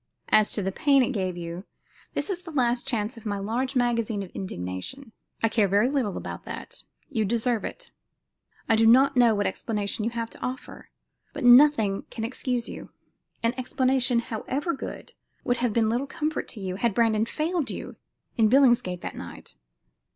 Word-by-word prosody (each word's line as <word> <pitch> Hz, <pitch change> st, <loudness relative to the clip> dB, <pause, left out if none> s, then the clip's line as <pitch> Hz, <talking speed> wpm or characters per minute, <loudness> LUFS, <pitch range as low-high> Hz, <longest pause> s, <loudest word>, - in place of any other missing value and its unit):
As 215 Hz, -1 st, +5 dB
to 205 Hz, -, -1 dB
the 190 Hz, -, -1 dB
pain 275 Hz, +5 st, +4 dB
it 250 Hz, -, 0 dB
gave 185 Hz, -6 st, -2 dB
you" 170 Hz, +1 st, -6 dB, 0.5 s
this -, -, -1 dB
was 375 Hz, -3 st, -3 dB
the 350 Hz, -, -10 dB
last 245 Hz, -4 st, 0 dB
charge 230 Hz, -1 st, -1 dB
of 230 Hz, -, -12 dB
my 205 Hz, -1 st, -1 dB
large 235 Hz, +7 st, -2 dB
magazine 230 Hz, -4 st, +1 dB
of 185 Hz, -, -10 dB
indignation 140 Hz, -, -6 dB, 0.3 s
"I -, -, +6 dB
care 215 Hz, -2 st, +2 dB
very 205 Hz, +6 st, +3 dB
little 255 Hz, -9 st, -1 dB
about -, -, -6 dB
that. -, -, -6 dB, 0.3 s
You 225 Hz, -6 st, +1 dB
deserve 230 Hz, +2 st, 0 dB
it. -, -, -7 dB, 0.8 s
I 225 Hz, -, +4 dB
do 225 Hz, 0 st, +4 dB
not 270 Hz, +4 st, +6 dB
know 240 Hz, -3 st, +5 dB
what 205 Hz, 0 st, 0 dB
explanation 205 Hz, +1 st, -2 dB
you 225 Hz, -, +1 dB
have 230 Hz, -1 st, -4 dB
to -, -, -13 dB
offer, 255 Hz, +1 st, -6 dB, 0.4 s
but 290 Hz, -, -5 dB
nothing 245 Hz, -5 st, +6 dB
can 225 Hz, -, -5 dB
excuse 245 Hz, 0 st, -2 dB
you. -, -, -8 dB, 0.5 s
An 230 Hz, +1 st, +2 dB
explanation, 255 Hz, -1 st, +1 dB
however 260 Hz, +7 st, -2 dB
good, 270 Hz, -, -7 dB, 0.3 s
would 245 Hz, -, +1 dB
have 245 Hz, -1 st, 0 dB
been 225 Hz, +1 st, +2 dB
little 240 Hz, +5 st, 0 dB
comfort 305 Hz, +2 st, -3 dB
to 225 Hz, -, -6 dB
you 185 Hz, -1 st, -4 dB
had 225 Hz, -1 st, 0 dB
Brandon 225 Hz, -1 st, +2 dB
failed 315 Hz, 0 st, -1 dB
you -, -, -6 dB, 0.4 s
in 220 Hz, -2 st, +4 dB
Billingsgate 240 Hz, -9 st, +4 dB
that -, -, -6 dB
night." -, -, -10 dB
235 Hz, 180 wpm, -26 LUFS, 210-260 Hz, 0.8 s, I